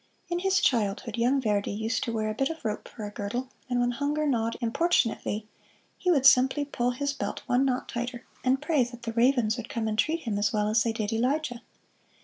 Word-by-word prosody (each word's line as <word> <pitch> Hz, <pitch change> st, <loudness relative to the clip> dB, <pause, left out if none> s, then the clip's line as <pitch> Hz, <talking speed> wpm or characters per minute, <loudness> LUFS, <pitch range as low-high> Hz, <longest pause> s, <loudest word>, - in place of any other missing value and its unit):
In 345 Hz, 0 st, 0 dB
his 385 Hz, +1 st, +2 dB
childhood 215 Hz, -2 st, +1 dB
young 245 Hz, +4 st, +2 dB
Verdi 210 Hz, -5 st, 0 dB
used 220 Hz, +2 st, -1 dB
to 235 Hz, -, -2 dB
wear 215 Hz, -1 st, -1 dB
a -, -, -3 dB
bit 270 Hz, +5 st, 0 dB
of 325 Hz, -6 st, -7 dB
rope 210 Hz, -1 st, -3 dB
for 215 Hz, -, -8 dB
a 205 Hz, -, -6 dB
girdle, 240 Hz, +6 st, -4 dB, 0.2 s
and 245 Hz, -1 st, +1 dB
when 245 Hz, 0 st, +2 dB
hunger 290 Hz, +4 st, -1 dB
gnawed 230 Hz, -5 st, 0 dB
importunately, 230 Hz, -5 st, 0 dB, 0.5 s
he 365 Hz, -, -2 dB
would 280 Hz, -7 st, +3 dB
simply 265 Hz, +2 st, +5 dB
pull 245 Hz, -4 st, -1 dB
his 280 Hz, +3 st, -1 dB
belt -, -, -4 dB
one 255 Hz, +1 st, +2 dB
knot 255 Hz, -1 st, -1 dB
tighter, 240 Hz, +1 st, -4 dB, 0.2 s
and 260 Hz, +1 st, +3 dB
pray 295 Hz, -4 st, +3 dB
that 240 Hz, 0 st, -8 dB
the 230 Hz, -1 st, -4 dB
ravens 240 Hz, -2 st, +3 dB
would 240 Hz, -1 st, -6 dB
come 225 Hz, -1 st, -2 dB
and 215 Hz, 0 st, -2 dB
treat 320 Hz, +7 st, +1 dB
him 215 Hz, -6 st, -2 dB
as 205 Hz, -, +2 dB
well 210 Hz, -1 st, +1 dB
as 220 Hz, +1 st, +3 dB
they 230 Hz, -, +1 dB
did 220 Hz, -1 st, -2 dB
Elijah. 250 Hz, +1 st, 0 dB
245 Hz, 220 wpm, -28 LUFS, 220-270 Hz, 0.5 s, simply